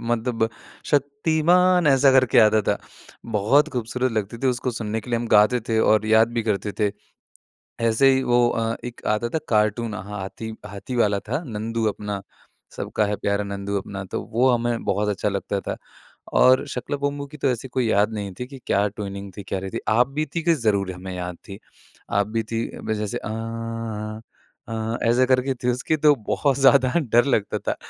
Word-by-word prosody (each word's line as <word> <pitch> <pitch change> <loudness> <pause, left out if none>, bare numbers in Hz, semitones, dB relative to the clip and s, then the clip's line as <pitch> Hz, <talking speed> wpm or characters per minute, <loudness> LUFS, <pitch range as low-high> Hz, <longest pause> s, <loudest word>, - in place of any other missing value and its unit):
मतलब 115 -1 0 0.4
शक्तिमान, 160 +5 +3
ऐसा 135 -1 +5
करके 130 -3 +4
आता 110 -1 +6
था। - - +1 0.6
बहुत 135 +9 +4
ख़ूबसूरत 125 +1 -1
लगती 110 +1 -3
थी 135 - +2
उसको 125 0 0
सुनने 110 -1 -3
के 120 - -11
लिए 120 - +1
हम 120 - -3
गाते 110 +4 +5
थे 110 -1 +2
और 110 -1 +3
याद 110 +1 +5
भी 120 -1 -1
करते 105 -2 -1
थे। 105 -1 +2 0.9
ऐसे 125 +5 +4
ही 130 0 +2
वो 120 -1 +3
अ, 115 -1 -1
एक 120 -1 -7
आता 105 +2 +1
था 160 - -1
कार्टून, 110 +1 +1
हाथी 105 +2 -6
हाथी 105 +5 -6
वाला 105 -3 +2
था, 150 - -1
नंदू 115 0 -3
अपना 105 -1 -4 0.5
सबका 105 - -1
है 105 0 -1
प्यारा 100 0 -1
नंदू 100 0 -4
अपना, 100 0 -6
तो 95 - -4
वो 125 +4 +3
हमें 120 -1 0
बहुत 105 +2 0
अच्छा 105 +1 0
लगता 100 0 -2
था। - - -4 0.6
और 130 +1 +5
शाका 125 +3 -5
लाका 145 - -2
बूम 145 0 -1
बूम 140 0 -6
की 150 +2 -12
तो 135 -1 +1
ऐसी 125 +1 -4
कोई 130 -1 -1
याद 105 +2 +3
नहीं 100 -3 -4
थी 125 - -3
कि 135 -1 -11
क्या 100 +1 +2
ट्यूनिंग 100 -1 -6
थी, 100 - -6
क्या 95 0 -3
रही 95 - -5
थी? - - -4
आप 120 +3 +4
बीती 150 +3 -3
कि 170 +1 +4
ज़रूर 100 -3 +2
हमें 95 +1 -7
याद 90 -1 -5
थी, 100 +1 -9 0.5
आप 100 0 +1
बीती 115 +1 -2
में 110 - -1
जैसे 105 -1 -3
आँ, 115 -1 -5 0.5
आँ 115 +1 -2
ऐसे 120 +3 +4
करके 130 +1 +2
थी 125 0 -2
उसकी 125 +5 0
तो 150 0 +5
बहुत 140 -2 +1
ज़्यादा 135 -1 +5
डर 120 -1 +3
लगता 115 -7 0
था। - - -2
115 Hz, 195 wpm, -23 LUFS, 105-130 Hz, 0.9 s, आता